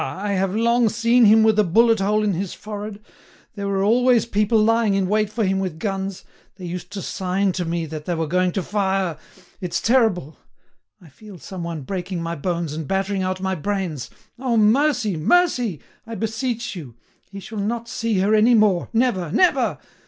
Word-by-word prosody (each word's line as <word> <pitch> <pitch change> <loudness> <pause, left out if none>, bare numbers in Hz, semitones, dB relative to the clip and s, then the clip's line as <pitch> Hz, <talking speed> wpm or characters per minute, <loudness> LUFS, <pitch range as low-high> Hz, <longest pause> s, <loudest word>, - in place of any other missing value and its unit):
I 200 +9 -3
have 195 0 0
long 235 +1 +3
seen 235 +2 +3
him 220 +1 +6
with 220 -1 +3
a - - +6
bullet 225 +5 +3
hole 210 +2 +1
in 205 -2 +1
his 185 +1 -4
forehead. 210 0 -8 0.5
There 200 -1 -5
were 195 -1 0
always 240 +3 +3
people 210 0 +1
lying 220 -1 +3
in 195 -1 +1
wait 210 +1 +1
for 215 0 -1
him 190 0 0
with 185 -5 -3
guns. 195 0 -4 0.3
They 185 -1 -9
used 180 +1 -6
to 195 - -5
sign 190 +1 -1
to 180 -1 -3
me 165 0 -2
that 155 -1 -7
they 175 - -1
were 165 0 -1
going 180 +3 +1
to 190 - -2
fire.... 190 -4 -1 0.4
It's 170 -2 -2
terrible! 220 - +1 0.6
I 170 - -17
feel 205 +6 -13
some 180 +1 -8
one 165 -4 -5
breaking 180 +3 -4
my 165 0 -3
bones 170 0 -3
and 155 -2 -5
battering 195 0 -1
out 185 0 -2
my 190 0 -1
brains. 185 -5 -3 0.3
Oh! 250 -3 0
Mercy! 225 - +2
Mercy! 245 - +1 0.3
I 230 - -6
beseech 225 +1 -3
you; 140 -10 -9 0.3
he 200 +1 -8
shall 210 +3 -7
not 230 +3 -2
see 230 -3 -2
her 205 +3 +2
any 220 +3 +5
more—never, 210 -2 +1
never! 365 - +2
200 Hz, 190 wpm, -22 LUFS, 180-220 Hz, 0.6 s, him